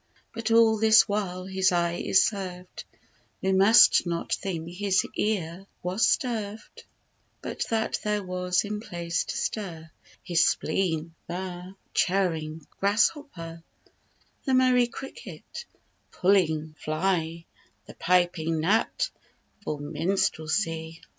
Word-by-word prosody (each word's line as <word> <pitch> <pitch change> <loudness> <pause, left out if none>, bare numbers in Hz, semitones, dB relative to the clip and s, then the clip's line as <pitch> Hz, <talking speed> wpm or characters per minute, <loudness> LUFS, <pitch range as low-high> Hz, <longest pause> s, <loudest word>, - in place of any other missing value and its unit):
But 230 0 -3
all 225 -1 +5
this 220 0 +6
while 190 -3 -2
his 190 0 +1
eye 170 -1 0
is 190 - +4
served, 185 -3 -5 0.5
We 190 - 0
must 195 0 +6
not 170 -1 -2
think 170 -4 -3
his 195 +1 +1
ear 195 -3 -2 0.2
was 185 +5 +2
sterved; 220 -4 -2 0.6
But - - -4
that 220 -1 0
there 210 -1 0
was 180 0 0
in 210 0 -4
place 170 -5 -3
to - - -4
stir 165 -7 -4 0.3
His 170 -2 +2
spleen, 165 -3 0
the 180 +1 -6 0.2
chirring 165 -5 0
grasshopper, 200 - 0 0.8
The 265 -3 +1
merry 255 -1 +4
cricket, 270 - -9 0.5
puling 160 -5 +2
fly, 165 0 -1 0.4
The - - -11
piping 175 -2 +1
gnat 195 +8 +1 0.6
for 150 - -3
minstrelsy. 160 +1 -1
185 Hz, 110 wpm, -27 LUFS, 165-210 Hz, 0.8 s, this